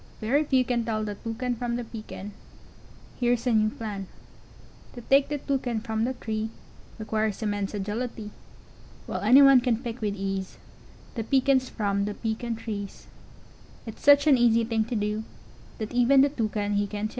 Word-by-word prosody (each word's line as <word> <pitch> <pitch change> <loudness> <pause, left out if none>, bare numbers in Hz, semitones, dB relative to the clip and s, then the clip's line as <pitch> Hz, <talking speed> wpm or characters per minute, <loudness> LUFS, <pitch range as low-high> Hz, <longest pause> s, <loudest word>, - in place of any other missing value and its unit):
] - - -26
Very 270 +8 +2
few 260 -3 +2
can 240 -2 0
Tell 215 -1 -2
the 210 -1 -3
Toucan 230 +4 -3
From 240 0 -3
the 245 - -3
Pecan 215 -3 -8 0.9
Here's 245 -1 +1
a 250 - +2
new 215 -1 +3
plan: 205 -4 -6 0.9
To 240 - -9
take 275 +4 +3
the 295 - -1
Toucan 260 -5 -2
from 220 0 -2
the 260 - -1
tree, 220 -1 -3 0.5
Requires 215 -1 -2
im 210 - 0
mense 205 0 -3
a - - -2
gil 205 +4 -3
i 255 - -1
tee, 215 -3 -9 0.7
While - - -4
any 250 +7 +7
one 275 -2 +7
can 240 -3 +1
pick 235 0 -6
with 205 -2 -1
ease 195 -1 -4 0.6
The 225 - -3
Pecans 260 +1 +2
from 200 -2 -1
the 205 0 -4
Pecan 230 +1 -3
trees: 205 -3 -6 0.8
It's 225 - -9
such 285 0 +6
an 280 -5 +5
easy 230 -1 +4
thing 225 -1 0
to 235 - -4
do, 210 +1 -1 0.5
That 220 +1 -5
even 245 +3 +5
the 280 - +4
Toucan 210 -5 -1
he 205 0 +1
can 210 +1 -4
too. - - -13
225 Hz, 190 wpm, -26 LUFS, 210-245 Hz, 0.9 s, any